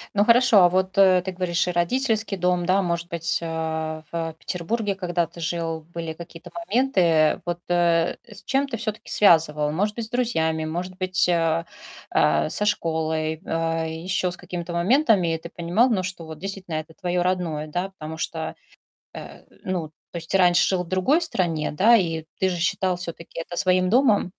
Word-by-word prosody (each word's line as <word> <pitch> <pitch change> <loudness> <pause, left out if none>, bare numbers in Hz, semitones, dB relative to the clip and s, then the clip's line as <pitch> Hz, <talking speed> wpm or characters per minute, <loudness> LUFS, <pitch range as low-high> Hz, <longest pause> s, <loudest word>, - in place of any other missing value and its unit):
Ну, 205 - +4
хорошо, 235 -1 +5
а 175 - +6
вот, 185 +1 -1
э, 190 -2 +6
ты 190 - -2
говоришь, 180 -1 -1
и - - 0
родительский 220 +4 0
дом, 180 -1 +1
да. 190 +2 +3
Может 170 -1 -2
быть, 165 -2 0
а, 160 -1 -3
в 165 -1 -3
Петербурге, 200 +4 -2
когда 175 -3 -1
ты 170 - -14
жил, 165 -1 -2
были 165 -1 -4
какие-то 170 +1 -11
моменты? 170 - +2
Вот, 175 0 -3
э, 170 -1 +2
с 210 -3 -12
чем 275 +1 0
ты 245 -4 -4
всё-таки 215 0 -5
связывал? 155 -6 +4
Может 205 +7 -1
быть, 235 - -3
с - - -12
друзьями, 160 -11 0
может 175 +4 -4
быть, 185 -1 +1
а, 165 -1 +1 0.5
э, - - +2
со 210 - 0
школой, 160 -5 -1
э, 165 0 -1
ещё 180 0 0
с 180 - -7
какими-то 175 -1 -6
моментами. 190 - +3
И - - -3
ты 165 +1 -10
понимал, 175 +10 +1
ну, 210 -6 +1
что 180 -2 -5
вот 160 -1 -9
действительно 190 -2 -5
это 155 +1 -5
твоё 180 -1 -1
родное, 175 -4 -1
да. 180 +5 -3
Потому 160 -4 -8
что, 160 0 -4 0.6
э, - - -10 0.2
ну, 180 -4 -3 0.2
то - - -15
есть 165 -1 -7
ты 195 - +3
раньше 175 -2 +4
жил 185 -2 0
в - - -13
другой 185 - +2
стране, 175 - -1
да, 215 +10 +5
и 165 -6 0
ты 190 - +2
же 180 - -2
считал 180 +2 0
всё-таки 170 -2 -7
это 175 - -8
своим 185 0 +2
домом? 225 -4 +3
175 Hz, 185 wpm, -24 LUFS, 165-190 Hz, 0.6 s, а